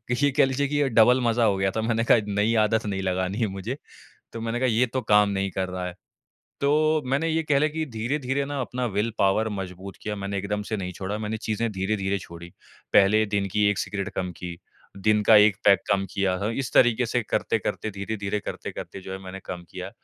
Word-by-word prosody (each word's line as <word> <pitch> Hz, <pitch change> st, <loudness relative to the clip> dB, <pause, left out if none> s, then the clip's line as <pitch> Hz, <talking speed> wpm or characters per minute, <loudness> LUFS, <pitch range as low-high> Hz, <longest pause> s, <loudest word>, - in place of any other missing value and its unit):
ये 145 Hz, +3 st, +2 dB
कह -, -, +6 dB
लीजिए 135 Hz, +2 st, 0 dB
कि 145 Hz, -1 st, +1 dB
डबल 120 Hz, +3 st, +5 dB
मज़ा 120 Hz, -1 st, +2 dB
हो 100 Hz, -3 st, +3 dB
गया 95 Hz, 0 st, +1 dB
था, 110 Hz, -, -2 dB
मैंने 115 Hz, 0 st, 0 dB
कहा -, -, +6 dB
नई 105 Hz, +3 st, +1 dB
आदत 110 Hz, 0 st, 0 dB
नहीं 95 Hz, -2 st, -2 dB
लगानी 95 Hz, +1 st, -1 dB
है 115 Hz, -, +2 dB
मुझे। 100 Hz, +6 st, -5 dB, 0.6 s
तो 115 Hz, -, -6 dB
मैंने 115 Hz, +1 st, -2 dB
कहा 130 Hz, -, +2 dB
ये 120 Hz, +2 st, +3 dB
तो 130 Hz, +2 st, -2 dB
काम 105 Hz, -3 st, +4 dB
नहीं 100 Hz, -1 st, -1 dB
कर 95 Hz, 0 st, -2 dB
रहा 90 Hz, 0 st, -4 dB
है, 90 Hz, -, -6 dB, 0.7 s
तो 155 Hz, +2 st, +3 dB
मैंने 140 Hz, +5 st, 0 dB
ये 160 Hz, 0 st, +1 dB
कह 145 Hz, -2 st, +2 dB
लें 155 Hz, +1 st, +2 dB
कि 160 Hz, 0 st, -2 dB
धीरे-धीरे 135 Hz, +4 st, -1 dB
ना 140 Hz, 0 st, -4 dB
अपना 125 Hz, 0 st, -3 dB
विल 105 Hz, +1 st, -1 dB
पावर 105 Hz, +3 st, +2 dB
मज़बूत 95 Hz, -1 st, -6 dB
किया, 105 Hz, -1 st, -3 dB
मैंने 100 Hz, 0 st, -3 dB
एकदम 105 Hz, +2 st, -2 dB
से 110 Hz, -, 0 dB
नहीं 90 Hz, -2 st, -4 dB
छोड़ा, 95 Hz, +3 st, -4 dB
मैंने 110 Hz, 0 st, -3 dB
चीज़ें 110 Hz, +1 st, -2 dB
धीरे-धीरे 95 Hz, 0 st, -1 dB
छोड़ी। 85 Hz, -1 st, -10 dB, 0.4 s
पहले 105 Hz, +2 st, +5 dB
दिन 100 Hz, -1 st, -1 dB
की 105 Hz, 0 st, +2 dB
1 100 Hz, -, -2 dB
सिगरेट 100 Hz, -1 st, -3 dB
कम 90 Hz, -1 st, -2 dB
की, 90 Hz, -1 st, -6 dB, 0.4 s
दिन 105 Hz, +2 st, +2 dB
का 110 Hz, +1 st, +7 dB
1 105 Hz, -2 st, +6 dB
पैक 100 Hz, -1 st, +6 dB
कम 100 Hz, -1 st, +2 dB
किया 95 Hz, -2 st, 0 dB
था, 105 Hz, +2 st, -1 dB
इस 130 Hz, +3 st, -3 dB
तरीके 120 Hz, 0 st, +4 dB
से 120 Hz, +2 st, 0 dB
करते-करते, 110 Hz, 0 st, -1 dB
धीरे-धीरे 100 Hz, 0 st, -3 dB
करते-करते 95 Hz, -, -7 dB
जो 95 Hz, 0 st, -8 dB
है 95 Hz, -, -5 dB
मैंने 95 Hz, +1 st, -7 dB
कम 90 Hz, -1 st, -6 dB
किया 95 Hz, +1 st, -7 dB
105 Hz, 220 wpm, -25 LUFS, 95-120 Hz, 0.7 s, का